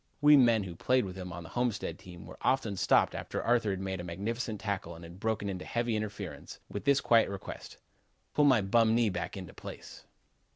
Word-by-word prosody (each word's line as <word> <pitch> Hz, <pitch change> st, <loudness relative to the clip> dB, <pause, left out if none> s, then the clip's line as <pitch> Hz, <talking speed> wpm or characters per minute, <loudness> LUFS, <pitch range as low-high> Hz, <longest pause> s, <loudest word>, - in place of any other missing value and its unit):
We 150 Hz, 0 st, +7 dB
men 120 Hz, -6 st, +5 dB
who 90 Hz, -2 st, -6 dB
played 125 Hz, +6 st, +2 dB
with 90 Hz, -1 st, -7 dB
him 90 Hz, -2 st, -7 dB
on 85 Hz, +1 st, -7 dB
the 80 Hz, -, -11 dB
Homestead 120 Hz, -3 st, -2 dB
team 90 Hz, -2 st, -11 dB
were -, -, -12 dB
often 115 Hz, -6 st, +1 dB
stopped 95 Hz, -, +3 dB
after -, -, -4 dB
Arthur 115 Hz, -3 st, +2 dB
had 95 Hz, -2 st, -2 dB
made 95 Hz, -1 st, -3 dB
a -, -, -5 dB
magnificent 105 Hz, +5 st, -3 dB
tackle 100 Hz, -5 st, -3 dB
and 85 Hz, -, -12 dB
had 85 Hz, +2 st, -11 dB
broken 110 Hz, -1 st, -1 dB
up 95 Hz, -2 st, -4 dB
heavy 120 Hz, +3 st, -1 dB
interference, 105 Hz, -1 st, -6 dB
with 100 Hz, -, -6 dB
this 140 Hz, 0 st, +4 dB
quiet 115 Hz, -3 st, +4 dB
request: 100 Hz, -1 st, -8 dB, 0.6 s
"'Pull 150 Hz, -, +4 dB
my 130 Hz, -6 st, +5 dB
bum 110 Hz, +3 st, +3 dB
knee 115 Hz, -2 st, +3 dB
back 90 Hz, +2 st, -4 dB
into 90 Hz, -3 st, -8 dB
place.' -, -, -10 dB
105 Hz, 210 wpm, -31 LUFS, 95-120 Hz, 0.6 s, We